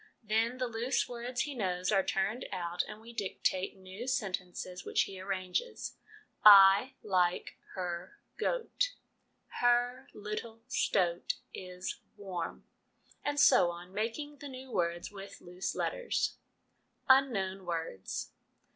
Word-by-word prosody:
Then 225 +3 +1
the 255 - 0
loose 235 +2 0
words 245 0 -3
he 295 - -2
knows 185 -6 -1
are 195 -2 +5
turned 195 +7 -1
out, 175 -2 -1
and 210 0 -8
we 230 +2 -12
dictate 190 -3 -1
new 190 +6 -8
sentences, 185 -6 -3
which - - +2
he 190 -1 -7
arranges: 195 - -3 0.3
' - - -45
I 200 +5 +9
like 180 -3 +1 0.2
her 180 -1 -4 0.2
goat - - 0 0.2
'; - - -45
' - - -46
her 245 +1 +2
little 220 +2 -6
stoat 180 -8 +1 0.2
is 180 0 -5 0.2
warm,' 185 -5 -5 0.6
and 290 0 0
so 250 -11 +7
on, 175 +2 -8
making 235 +8 -3
the 285 0 -8
new 260 0 -9
words 175 -3 -1
with 200 -1 -9
loose 180 +1 -4
letters. - - -1 0.7
Unknown 200 -8 +4
Words. 165 - -3
200 Hz, 130 wpm, -32 LUFS, 185-245 Hz, 0.7 s, I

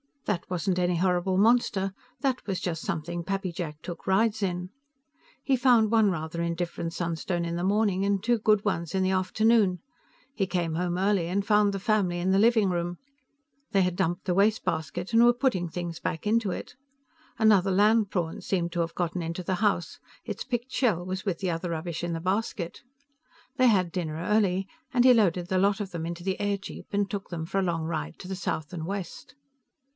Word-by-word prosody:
That 195 -5 -2
wasn't 180 +1 0
any 180 0 +1
horrible 180 +1 +1
monster, 200 -3 +3 0.3
that 265 -5 -1
was 190 -3 -1
just 165 -3 -3
something 170 +2 -3
Pappy 195 0 -2
Jack 160 -3 -6
took 175 +2 -8
rides 215 +3 +2
in. 180 -2 -2 0.7
He 270 - +2
found 240 -4 +4
one 220 -3 +5
rather 160 -1 -3
indifferent 170 0 -3
sunstone 170 0 -2
in 170 0 -3
the 175 - -2
morning 200 -1 +2
and 200 -1 0
two 240 0 +2
good 210 -1 +3
ones 170 -4 -1
in 190 - +2
the 185 - +2
afternoon. 190 0 +2 0.5
He 195 -8 -1
came 175 -3 -1
home 175 +1 -1
early 190 -2 +1
and 195 +3 -1
found 210 -1 +4
the 195 - -3
family 195 -4 +1
in 185 +2 +1
the 195 - +4
living 220 -2 +4
room; 175 0 -2 0.8
they 195 - +4
had 180 -1 0
dumped 175 +2 -1
the 180 - +1
wastebasket 185 -3 0
and 230 +1 +6
were 240 0 +6
putting 240 -9 0
things 170 -1 -5
back 160 - -3
into 220 -1 +2
it. 185 - -6 0.6
Another 205 -4 +4
land 210 +2 +4
prawn 170 -4 -2
seemed 175 -3 -1
to 175 - -3
have 165 0 -1
gotten 175 0 -1
into 170 +2 -4
the 185 +1 -1
house; 200 -4 0 0.2
its 215 -2 -5
picked 245 0 -3
shell 200 -10 +1
was 185 +2 -4
with 185 -5 -1
the 185 -3 -1
other 165 +2 -3
rubbish 165 0 -4
in 175 -1 -2
the 165 - -2
basket. 185 -1 -2 0.8
They 255 - +5
had 185 -6 +3
dinner 165 -4 -3
early, 190 +2 +1 0.3
and 245 -1 +4
he 255 0 +8
loaded 180 -6 +2
the 190 -1 +2
lot 200 +2 +2
of 200 -2 -4
them 165 -2 -4
into 170 0 -6
the 190 0 -1
airjeep 200 -1 -3
and 200 -1 0
took 200 -2 -5
them 165 -2 -4
for 195 +4 -1
a - - +1
long 170 -3 -1
ride 80 - -4
to - - -9
the 190 - -3
south 160 -3 -3
and 165 -2 -4
west. 200 +5 -6
185 Hz, 200 wpm, -27 LUFS, 175-205 Hz, 0.8 s, he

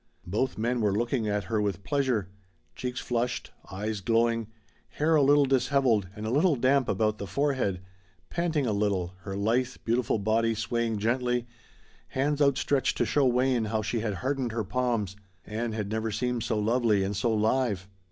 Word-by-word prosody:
Both 105 +9 -1
men 120 +2 0
were 105 -2 +2
looking 120 0 0
at 105 0 0
her 110 0 -1
with 100 -2 -2
pleasure: 130 -9 0 0.5
cheeks 125 0 -4
flushed, 120 0 -2 0.2
eyes 105 +2 -3
glowing, 115 +1 +1 0.4
hair 155 +2 +1
a 155 - +5
little 145 +1 +5
disheveled 130 -5 +2
and 105 0 -6
a 110 - -1
little 150 +4 +3
damp 130 +1 +2
about 105 +1 +1
the 100 - -5
forehead, 125 -5 0 0.5
panting 165 - 0
a 110 - 0
little, 100 -3 0
her 95 +1 -6
lithe, 120 +5 +1
beautiful 120 0 +1
body 110 +2 +1
swaying 115 0 -1
gently, 125 +2 0 0.6
hands 145 +2 0
outstretched 140 -1 +2
to - - +2
show 140 -3 +2
Wayne 125 -1 +2
how 110 0 -1
she 115 +2 -1
had 105 -2 -2
hardened 130 +2 -2
her 115 -1 -1
palms, 105 -2 -1 0.3
Ann 110 +2 -3
had 105 -2 -3
never 110 0 -1
seemed 125 +2 -1
so 115 -1 -1
lovely 110 -2 +2
and 100 +1 -2
so 115 +4 +1
live. 110 -3 +1
115 Hz, 170 wpm, -28 LUFS, 105-130 Hz, 0.6 s, a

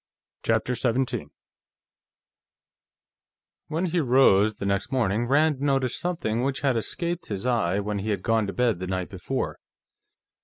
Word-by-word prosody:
CHAPTER 115 +2 +1
17 125 - -1 2.4
When 160 +4 -1
he 175 0 0
rose, 120 -7 +4
the - - -5
next 100 0 -1
morning, 120 -3 +1
Rand 145 +1 +3
noticed 135 -3 +1
something 160 -11 -1
which 135 +1 -1
had 135 -3 +2
escaped 170 +9 -2
his 100 +1 -4
eye 110 -7 +1
when 105 0 -2
he 105 +3 -3
had 100 -3 -1
gone 110 -2 +2
to 100 - -4
bed 120 -7 +1
the 90 - -4
night 95 -1 -2
before. 100 +8 -3
120 Hz, 145 wpm, -26 LUFS, 100-135 Hz, 2.4 s, rose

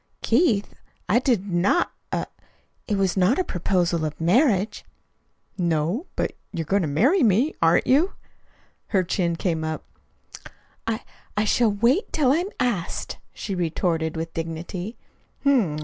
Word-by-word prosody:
"Keith, 230 - +2 0.3
I 220 +6 +4
did 235 -7 +1
NOT 185 - +2 0.2
er - - -1 0.6
it 205 - 0
was 195 -2 +1
not 190 +7 +3
a 370 - +2
proposal 175 - 0
of 155 -1 -3
marriage." 205 - +2 0.8
"No? 170 - 0
But - - -1 0.2
you're 165 -2 -3
going 200 +5 +2
to 165 - 0
marry 255 - +3
me, 235 +7 +3
aren't 165 +1 +4
you?" 300 +9 +3 0.7
Her 190 -4 +2
chin 170 -1 0
came 165 -2 -1
up. 160 0 -4 1.0
"I 225 +1 -1 0.4
I 210 - +3
shall 225 0 +3
wait 235 - +2
till 275 -5 +3
I'm 345 +7 +1
asked," 220 -9 -2
she 200 - -5
retorted 165 -2 -1
with 165 0 -4
dignity. 170 +6 -5
195 Hz, 135 wpm, -24 LUFS, 170-240 Hz, 1.0 s, I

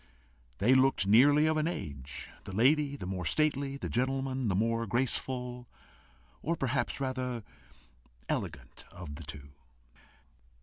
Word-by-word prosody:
They 120 - +4
looked 130 -5 +4
nearly 140 +9 +6
of 155 0 +2
an 155 +1 +1
age, 70 - -5 0.2
the 95 - -7
lady 140 +5 +3
the 135 - -7
more 90 0 -3
stately, 140 - +1
the - - -4
gentleman 130 0 0
the 95 - +1
more 115 +3 +1
graceful, 125 +1 -1 0.7
or, 165 +3 0
perhaps 135 -2 -1
rather, 130 -3 -2 0.8
ELEGANT, - - -4
of 90 -5 -8
the 80 +3 -8
two. 70 -1 -9
125 Hz, 130 wpm, -31 LUFS, 100-140 Hz, 0.8 s, nearly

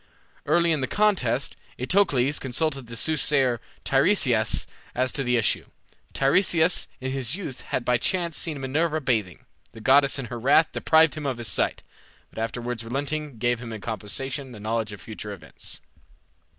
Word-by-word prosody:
Early 170 +2 +3
in 155 -3 +1
the 130 - 0
contest 160 - +1 0.2
Eteocles 140 -3 +2
consulted 135 0 -2
the 115 - -8
soothsayer 135 -3 +2 0.2
Tiresias 135 - +3 0.3
as 130 +1 +1
to 135 - -2
the 125 -1 +2
issue. 115 - +1 0.5
Tiresias 165 +4 +3
in 130 0 -3
his 135 0 -1
youth 160 -10 -6
had 120 - -3
by 125 -1 +2
chance 170 0 0
seen 155 -5 0
Minerva 155 +4 0
bathing. 110 - -1 0.3
The 115 - -11
goddess 140 +4 +4
in 135 - -4
her 120 - -4
wrath 145 +6 +4
deprived 160 -1 +4
him 150 -2 -4
of 130 -3 -2
his 120 -3 -2
sight, - - 0 0.5
but - - -8
afterwards 120 +1 -3
relenting 140 +3 -3
gave 120 +1 +1
him 120 -2 -7
in 110 - -5
compensation 125 +6 -4
the 110 - -10
knowledge 110 0 -2
of 105 - -8
future 105 0 -7
events. 95 - -8
130 Hz, 165 wpm, -25 LUFS, 115-155 Hz, 0.5 s, goddess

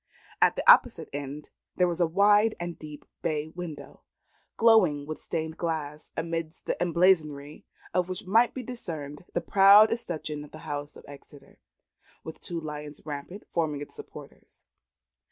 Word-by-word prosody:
At - - +5
the - - -4
opposite - - +6
end, 145 +1 -6 0.2
there 180 - +3
was 175 0 -2
a 170 - +4
wide 205 +5 +4
and 175 -1 -4
deep 150 -1 -10 0.2
bay 155 -1 -2
window, 165 -2 -9 0.6
glowing 190 -11 +4
with 155 +1 -6
stained 160 0 -4
glass, 155 -3 -4
amid 165 -1 -3
the - - -1
emblazonry 160 -5 +1 0.3
of 180 0 0
which 185 0 -5
might 225 +6 +3
be 260 - -5
discerned 160 - -6
the 175 - 0
proud 200 +4 +7
escutcheon 155 -9 -4
of 150 - -12
the - - -12
house 145 0 -5
of - - -14
Exeter, 140 0 -14 0.6
with 160 - -9
the - - -42
two 170 -1 -3
lions 150 -2 -8
rampant 150 +7 -7
forming 155 -4 -1
its 145 - -8
supporters. - - -13
160 Hz, 155 wpm, -27 LUFS, 150-180 Hz, 0.6 s, proud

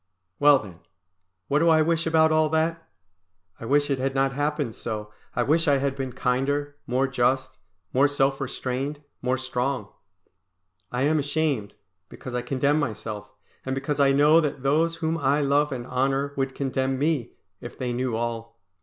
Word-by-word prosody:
Well 145 -1 +7
then, 95 -8 -10 0.7
what 145 - +2
do 165 +1 +4
I 160 -1 +5
wish 165 +1 0
about 160 -1 +4
all 155 0 +3
that? 165 +1 -1 0.7
I - - -7
wish 145 +3 +2
it 135 - 0
had 135 +1 -1
not 135 0 +2
happened 145 -3 -1
so, 105 -2 -5 0.2
I 120 - +2
wish 160 +5 +2
I 140 -1 +5
had 135 0 -1
been 135 -2 -4
kinder, 140 +3 -1
more 130 +2 +1
just, 130 +1 0 0.3
more 135 +3 +5
self 140 -1 0
restrained, 135 +2 -3 0.2
more 125 +1 0
strong. 130 +1 -2 1.0
I 125 +1 -1
am 155 +2 +3
ashamed, 145 -7 -1 0.3
because 125 - -9
I 125 - -1
condemn 140 +4 +1
myself, 110 -6 -4 0.3
and 130 0 -2
because 140 +2 -2
I 140 -1 +5
know 150 +4 +5
that 145 -3 -3
those 160 +4 +2
whom 165 0 -2
I 140 +1 +2
love 145 +1 +2
and 125 -3 -4
honour 135 +2 0
would 135 -1 -2
condemn 135 -1 -1
me, 145 -3 0 0.3
if - - -9
they 125 -1 -2
knew 125 -1 -1
all. 115 0 -4
135 Hz, 170 wpm, -25 LUFS, 125-150 Hz, 1.0 s, Well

